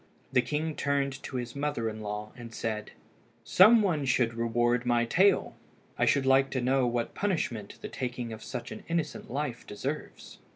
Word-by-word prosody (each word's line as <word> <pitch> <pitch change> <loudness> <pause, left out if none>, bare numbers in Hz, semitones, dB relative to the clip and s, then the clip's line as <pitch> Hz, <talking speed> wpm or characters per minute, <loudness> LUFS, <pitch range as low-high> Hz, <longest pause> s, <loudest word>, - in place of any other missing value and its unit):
The 125 - +5
king 150 +4 -2
turned 140 -1 -1
to - - -7
his 120 0 -4
mother 140 -5 -1
in 110 0 -5
law, 105 0 -5
and 120 -2 -10
said 110 -1 -3 0.5
"Some 215 +4 +7
one 165 -7 +1
should 125 -2 +2
reward 120 +1 +1
my 120 -1 +2
tale. 190 +10 +3 0.4
I - - +1
should 140 -2 +3
like 135 0 +4
to 130 - -1
know 130 +1 +2
what 120 -1 -1
punishment 140 - -2
the - - -3
taking 125 -3 -4
of 110 - -9
such - - -6
an - - -8
innocent 165 -4 -2
life 130 -2 -3
deserves." 135 +9 -6
125 Hz, 175 wpm, -29 LUFS, 115-145 Hz, 0.5 s, Some